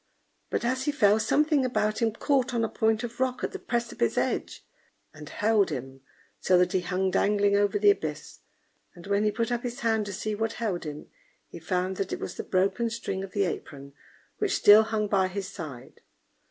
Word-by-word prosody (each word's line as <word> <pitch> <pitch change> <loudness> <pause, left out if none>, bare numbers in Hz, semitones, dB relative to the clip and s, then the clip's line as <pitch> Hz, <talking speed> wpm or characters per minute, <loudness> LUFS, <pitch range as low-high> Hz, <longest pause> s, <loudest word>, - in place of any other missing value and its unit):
But - - -2
as 260 +2 -1
he 295 - +1
fell, 210 -6 +3
something 300 +4 +2
about 215 -4 0
him 225 -1 +2
caught 260 +2 0
on 230 - +1
a - - -4
point 220 -1 +1
of 240 0 -6
rock 260 -1 -1
at - - -1
the - - -7
precipice 235 - -2
edge, - - -2 0.5
and 150 -1 -11
held 210 0 +2
him, 135 -2 -6 0.4
so 185 - +3
that 180 0 +3
he 190 - +2
hung 185 +1 -1
dangling 200 +1 +2
over 205 - +2
the 410 0 +6
abyss; 405 - -5 0.6
and 175 - -13
when 200 +1 +1
he 210 - +2
put 230 +3 -2
up 240 -1 -1
his 245 +2 -5
hand 220 -3 +1
to 200 - -5
see 215 +3 -3
what 225 +1 -2
held 200 -8 -3
him, 150 -1 -7 0.4
he - - -9
found 185 +3 -2
that 195 -1 -3
it - - -3
was - - -5
the - - -6
broken 195 +5 0
string 225 -4 -4
of 195 - -9
the 200 - +1
apron, 140 -6 -6 0.5
which 415 -2 +1
still 205 +1 +8
hung 220 -1 -1
by 195 -2 +2
his 190 +1 -5
side. 145 -10 -9
205 Hz, 205 wpm, -27 LUFS, 185-235 Hz, 0.6 s, still